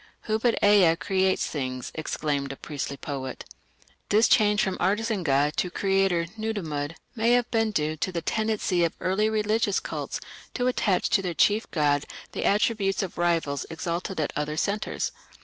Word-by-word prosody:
"Who 220 0 -1
but 235 0 +2
Ea 200 -5 +6
creates 190 +1 +1
things", 130 -4 -4
exclaimed 145 -3 -2
a - - -6
priestly 140 -1 -5
poet. 135 -3 -5 0.6
This 215 +3 +5
change 210 -2 +4
from 190 -2 -1
artisan 210 +2 +1
god 145 -1 +2
to 180 - +1
creator 195 -2 +1
(Nudimmud) 165 -9 -3 0.2
may 230 +1 +3
have 245 -1 +2
been 225 -1 +2
due 155 -6 -1
to 185 - -1
the 170 -2 -3
tendency 215 -5 0
of 170 - +1
early 210 +4 +1
religious 215 -1 +1
cults - - -4 0.4
to 245 - 0
attach 215 -6 +1
to 205 - +4
their 180 -3 -3
chief 210 +2 +3
god 145 -3 +1 0.3
the - - -3
attributes 205 -2 +2
of 185 - -6
rivals 165 -5 +1
exalted 170 +2 -3
at 155 - -1
other 150 +1 -2
centres. 205 +5 -1
185 Hz, 165 wpm, -26 LUFS, 155-215 Hz, 0.6 s, Ea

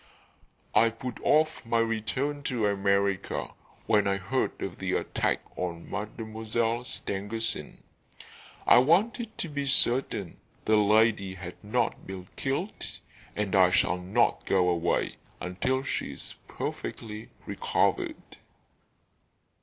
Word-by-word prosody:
"I 115 - +6
put 115 +2 -6
off 155 +1 +3
my 115 0 +1
return 115 +6 0
to 120 -4 0
America 100 -1 +1 0.3
when 105 -1 +3
I 100 0 +2
heard 120 +8 -1
of - - -5
the - - -1
attack - - 0
on 85 -2 -4
Mademoiselle 110 +2 -2
Stangerson. 110 +1 -2 0.8
I - - +8
wanted 215 - +2
to - - -2
be 145 -2 -3
certain 120 -8 +2 0.3
the 110 - +4
lady 105 -2 +3
had 90 +1 -9
not 110 +4 -1
been 95 -1 -7
killed, 140 +10 -3 0.4
and 105 -2 -1
I 95 -2 +7
shall 90 0 +2
not 95 +7 +2
go 90 -2 +3
away 85 0 0 0.2
until 95 +9 -1
she - - -2
is - - -7
perfectly 110 -1 -5 0.2
recovered." - - -1
110 Hz, 115 wpm, -28 LUFS, 95-125 Hz, 0.8 s, I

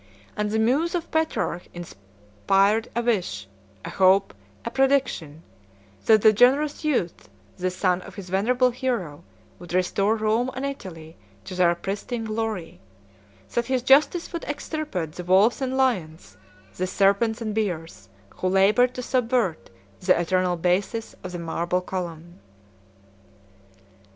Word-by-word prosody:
And 210 0 -1
the 220 - -1
muse 275 +11 +1
of 340 -1 -4
Petrarch 320 - -1
inspired 105 - -1
a 235 - 0
wish, 175 - -1 0.4
a - - -5
hope, 190 - +3 0.3
a - - -3
prediction, 265 - 0 0.6
that 220 -2 +5
the 220 - +7
generous 275 +8 +3
youth, 185 - -1 0.3
the 185 +1 -1
son 185 0 0
of - - -12
his 195 -3 -8
venerable 250 +6 +2
hero, 235 - -3 0.4
would 175 0 -6
restore 195 +4 +1
Rome 220 +3 0
and 260 +2 -3
Italy 170 - -7 0.3
to - - -7
their 175 -1 +3
pristine 205 +6 -4
glory; 215 - -4 0.7
that 235 0 0
his 260 -2 0
justice 300 +7 +3
would 335 - -4
extirpate 290 - -4
the 180 - -8
wolves 195 +9 +3
and 265 0 -1
lions, 160 - -1 0.4
the 185 - -1
serpents 200 +4 +2
and 220 -2 -3
bears, 165 - -4 0.3
who 185 - -1
labored 205 +7 +3
to 250 - -4
subvert 240 -9 0 0.3
the 185 -2 +3
eternal 180 +1 +1
basis 185 +6 -1
of 185 - -6
the 175 - -5
marble 170 +1 -1
column. 175 -1 -6
200 Hz, 135 wpm, -24 LUFS, 175-245 Hz, 0.7 s, the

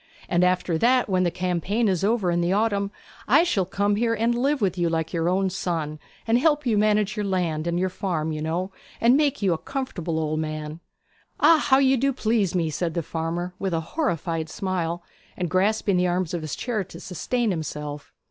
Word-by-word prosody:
And 175 0 +2
after 180 -2 +1
that, 250 +4 +3
when 185 -2 +1
the 180 - +2
campaign 185 +6 -1
is 185 -2 0
over 205 -4 +2
in 175 0 +1
the 175 +1 +1
autumn, 200 -1 +1 0.4
I 285 +9 +6
shall 210 - +1
come 205 +2 +1
here, 230 +1 +1
and 230 +2 +1
live 275 +4 +1
with 195 -6 +1
you 175 -2 +1
like 165 -1 -2
your 165 0 +1
own 190 +1 +1
son, 160 -5 -3 0.3
and 230 +2 +3
help 295 0 +2
manage 215 -2 +2
your 210 - -2
land 170 -5 -1
and 170 0 0
your 185 - +1
farm, 170 -4 -2
you 155 -1 -4
know, 170 +5 -2 0.3
and 235 +3 +5
make 285 -6 +1
you 190 -3 +3
a 160 - -3
comfortable 180 - -4
old 155 0 -1
man.' 155 0 -4 0.6
'Ah! 325 -1 +6
How 265 - +7
you 270 -1 +4
do 275 +3 +2
please 220 -7 0
me!' 165 -3 0
said 165 +2 -2
the 170 - -1
farmer, 170 +3 -3
with 190 -3 -1
a - - +1
horrified 165 - -1
smile, 175 -2 -2 0.3
and 175 -3 -2
grasping 200 +1 +2
the 180 0 +2
arms 180 -1 -1
of 175 - -2
his 155 -2 -4
chair 230 -5 -2
to 185 - -12
sustain 230 +5 -1
himself. 150 -3 -5
185 Hz, 205 wpm, -24 LUFS, 165-220 Hz, 0.6 s, How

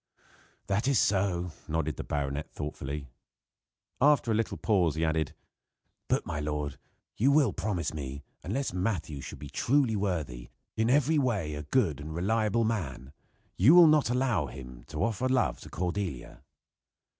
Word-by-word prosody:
"That 100 +5 0
is 140 -3 +3
so," 95 -4 +1 0.2
nodded 80 -1 -1
the - - -4
baronet 70 0 -3
thoughtfully. 75 -1 -5 1.0
After 140 -4 +4
a - - +3
little 110 +1 -1
pause 90 -8 +2
he 80 +1 +1
added: 80 -2 -1 0.7
"But, - - +1
my - - -3
lord, 75 -1 -3 0.4
you 130 +6 +4
will 140 -7 +4
promise 90 -7 -2
me, 70 -2 -6 0.2
unless 130 +4 -2
Matthew 90 -7 -2
shall - - -8
be 70 +1 -9
truly 135 -4 +2
worthy 75 -12 -2 0.3
in 110 +1 +1
every 145 +3 +3
way 105 - 0
a 75 - -4
good 80 - +1
and 80 +2 -6
reliable 110 +5 +1
man 80 - -3 0.4
you 130 - +7
will 175 -1 +10
not 155 -5 +4
allow 120 - +1
him 65 -2 -10
to 75 -1 -3
offer 115 +3 0
love 130 -1 +1
to - - -11
Cordelia?" 90 -5 -4
90 Hz, 155 wpm, -29 LUFS, 75-115 Hz, 1.0 s, will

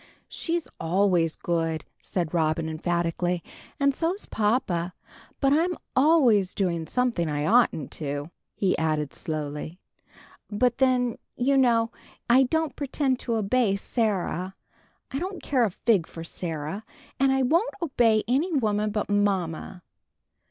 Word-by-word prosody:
"She's 335 -1 -2
always 175 -1 +2
good," 165 -2 -1 0.2
said 175 -3 -3
Robin, 160 -1 +1
emphatically; 170 +1 -1 0.4
"and 280 0 +3
so's 345 +8 -2
papa. 200 -6 0 0.4
But 275 -1 +3
I'm 340 +3 +2 0.2
always 255 - +4
doing 170 -4 -1
something 235 -7 0
I 145 0 -1
oughtn't 215 - +3
to," 145 +2 -3 0.2
he 190 -2 +1
added, 155 -3 0
slowly. 155 +2 -5 0.7
"But 235 +4 +1
then, 250 -3 +2 0.2
you 270 +3 +2
know, 235 -3 +3 0.4
I 245 +2 +6
don't 315 +1 0
pretend 275 -2 0
to 235 - -2
obey 220 0 +2
Sarah. 195 -4 -1 0.6
I 270 - -2
don't 365 -2 -5
care 255 -4 +2
a - - 0
fig 195 -2 +1
for 165 - -8
Sarah; 165 +3 -5 0.4
and 270 0 +4
I 265 0 +2
won't 335 - +2
obey 235 -9 +2
any 285 +10 +1
woman 215 -6 +1
but 210 0 -2
mamma." 190 -4 -1
210 Hz, 130 wpm, -26 LUFS, 170-260 Hz, 0.7 s, I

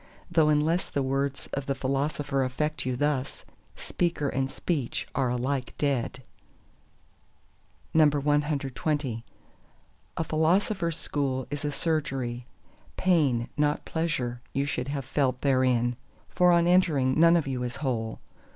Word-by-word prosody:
though 155 -2 +4
unless 155 +4 +2
the 140 - -1
words 135 +1 -1
of 140 -1 -3
the 135 - 0
Philosopher 140 +1 -1
affect 130 +3 -2
you 130 - 0
thus, 140 0 -1 0.3
speaker 170 -5 -1
and 135 0 -1
speech 145 -7 -2
are 130 -2 +1
alike 125 +2 -2
dead. 135 -2 -1 1.7
CXXI 145 -3 +1 1.0
A 165 - +1
Philosopher's 170 +2 +1
school 130 -3 -1
is 145 0 -4
a 145 - -1
Surgery: 135 -7 -2 0.5
pain, 145 -10 +2
not 150 +1 +1
pleasure, 130 -7 -2
you 140 +1 0
should 125 -2 -2
have 140 -2 -3
felt 130 -1 0
therein. 130 -3 +2 0.3
For 180 0 +4
on 170 -1 +4
entering 155 -7 +3
none 170 +1 +7
of 165 - 0
you 130 -2 -3
is 125 -1 -3
whole. 115 -6 -2
140 Hz, 125 wpm, -27 LUFS, 130-155 Hz, 1.7 s, none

